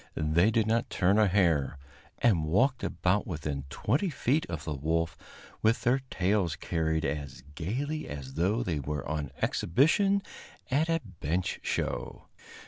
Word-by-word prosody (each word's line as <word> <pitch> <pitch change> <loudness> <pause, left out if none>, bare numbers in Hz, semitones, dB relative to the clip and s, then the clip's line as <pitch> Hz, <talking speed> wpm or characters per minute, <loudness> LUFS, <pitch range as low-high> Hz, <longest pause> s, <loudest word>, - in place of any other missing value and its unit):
They 80 +6 +3
did 110 -1 +2
not 115 +1 +1
turn 95 +4 +3
a 105 - +5
hair, 85 -8 +2 0.4
and 100 -10 +3
walked 125 - +2
about 90 +4 0
within 75 -5 -4
twenty 140 - 0
feet 150 +1 0
of 80 -2 -5
the 80 - -2
wolf 80 +4 -1 0.5
with 110 +1 +2
their 125 +3 +3
tails 95 -3 +1
carried 80 -2 -1
as 70 -2 -4
gayly 135 - -3
as 70 -2 -7
though 100 - +1
they 80 -7 -1
were 75 +2 -4
on 75 -2 -2
exhibition 195 - +3 0.5
at 155 +5 +2
a 165 0 +1 0.2
bench 90 +5 -1
show. - - -3
90 Hz, 145 wpm, -29 LUFS, 80-115 Hz, 0.5 s, a